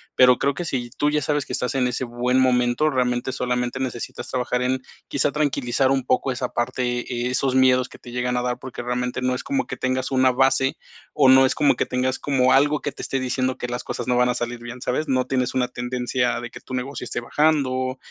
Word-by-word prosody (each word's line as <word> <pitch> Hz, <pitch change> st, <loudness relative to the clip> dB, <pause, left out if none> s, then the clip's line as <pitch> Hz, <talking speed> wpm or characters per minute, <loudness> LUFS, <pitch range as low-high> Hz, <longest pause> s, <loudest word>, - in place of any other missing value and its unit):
Pero 125 Hz, -1 st, +6 dB
creo 140 Hz, +1 st, +1 dB
que 175 Hz, -, -4 dB
si 120 Hz, -6 st, -3 dB
tú 145 Hz, +3 st, 0 dB
ya 150 Hz, 0 st, +1 dB
sabes 145 Hz, -2 st, 0 dB
que -, -, -5 dB
estás 125 Hz, -1 st, -1 dB
en 130 Hz, -2 st, +1 dB
ese 125 Hz, +1 st, -2 dB
buen 125 Hz, +1 st, 0 dB
momento, 125 Hz, +2 st, +2 dB
realmente 125 Hz, -1 st, 0 dB
solamente 125 Hz, -1 st, -2 dB
necesitas 120 Hz, -2 st, -5 dB
trabajar 125 Hz, 0 st, -1 dB
en 130 Hz, +1 st, 0 dB, 0.3 s
quizá 140 Hz, +1 st, 0 dB
tranquilizar 135 Hz, -3 st, +1 dB
un 135 Hz, -2 st, +1 dB
poco 130 Hz, +1 st, +1 dB
esa 125 Hz, -1 st, -3 dB
parte, 120 Hz, 0 st, -1 dB
eh, 120 Hz, 0 st, -3 dB
esos 130 Hz, 0 st, 0 dB
miedos 130 Hz, -1 st, +4 dB
que -, -, -13 dB
te 120 Hz, -, -12 dB
llegan 125 Hz, 0 st, -1 dB
a 125 Hz, -, 0 dB
dar 125 Hz, 0 st, -2 dB
porque 125 Hz, -2 st, -7 dB
realmente 125 Hz, 0 st, -2 dB
no 130 Hz, 0 st, +1 dB
es 125 Hz, -, -4 dB
como 275 Hz, -1 st, -1 dB
que -, -, -5 dB
tengas 130 Hz, +1 st, -1 dB
una 130 Hz, -1 st, +4 dB
base, 135 Hz, +1 st, +2 dB, 0.4 s
o 140 Hz, -3 st, +5 dB
no 130 Hz, 0 st, +7 dB
es -, -, -2 dB
como 145 Hz, -, +3 dB
que -, -, 0 dB
tengas 130 Hz, +1 st, -1 dB
como 130 Hz, -3 st, +2 dB
algo 145 Hz, +2 st, +4 dB
que 145 Hz, -, -2 dB
te -, -, -10 dB
esté 135 Hz, -, -2 dB
diciendo 130 Hz, 0 st, -1 dB
que 125 Hz, -, -4 dB
las 125 Hz, 0 st, -4 dB
cosas -, -, -5 dB
no 125 Hz, -1 st, +2 dB
van 125 Hz, 0 st, +3 dB
a 125 Hz, -, 0 dB
salir 120 Hz, 0 st, -3 dB
bien, 120 Hz, +1 st, -9 dB
¿sabes? 140 Hz, +6 st, -1 dB
No 130 Hz, -2 st, +1 dB
tienes 130 Hz, -1 st, -1 dB
una 125 Hz, -1 st, +2 dB
tendencia 125 Hz, 0 st, -1 dB
de 120 Hz, 0 st, -7 dB
que -, -, -10 dB
tu -, -, -11 dB
negocio 125 Hz, +1 st, -4 dB
esté 120 Hz, -, -4 dB
bajando, 130 Hz, -1 st, +1 dB
125 Hz, 240 wpm, -23 LUFS, 125-135 Hz, 0.4 s, no